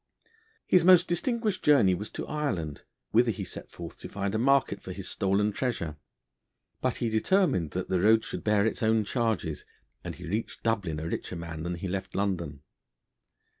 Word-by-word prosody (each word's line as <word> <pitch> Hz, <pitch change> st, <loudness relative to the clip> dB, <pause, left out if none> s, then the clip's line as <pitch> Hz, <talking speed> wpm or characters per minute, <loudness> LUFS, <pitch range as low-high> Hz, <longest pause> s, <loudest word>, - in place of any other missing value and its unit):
His 180 Hz, -, +4 dB
most 180 Hz, 0 st, +7 dB
distinguished 215 Hz, +3 st, 0 dB
journey 135 Hz, -11 st, +5 dB
was 105 Hz, +4 st, -4 dB
to -, -, -4 dB
Ireland, 95 Hz, -, -2 dB, 0.3 s
whither 120 Hz, +2 st, +4 dB
he 105 Hz, -, -2 dB
set -, -, -7 dB
forth 85 Hz, -1 st, -9 dB
to -, -, -8 dB
find 100 Hz, 0 st, -2 dB
a 110 Hz, -, +1 dB
market 130 Hz, -5 st, +2 dB
for 95 Hz, -, -7 dB
his 95 Hz, 0 st, -6 dB
stolen 100 Hz, +2 st, +1 dB
treasure. 100 Hz, -, -2 dB, 0.9 s
But -, -, 0 dB
he 120 Hz, -, -1 dB
determined 110 Hz, -, +2 dB
that 90 Hz, 0 st, -2 dB
the 95 Hz, -, +1 dB
road 110 Hz, +3 st, +5 dB
should -, -, -5 dB
bear 105 Hz, -1 st, +3 dB
its 110 Hz, -, -1 dB
own 110 Hz, -1 st, +3 dB
charges, 110 Hz, -, -1 dB, 0.4 s
and -, -, -5 dB
he 90 Hz, -, -9 dB
reached 105 Hz, +7 st, -3 dB
Dublin 100 Hz, -9 st, 0 dB
a 80 Hz, -, -4 dB
richer 90 Hz, -, -4 dB
man 85 Hz, -2 st, -6 dB
than 85 Hz, +2 st, -3 dB
he 85 Hz, +3 st, -5 dB
left 95 Hz, +1 st, -4 dB
London. 85 Hz, -8 st, -2 dB
100 Hz, 180 wpm, -28 LUFS, 90-120 Hz, 0.9 s, most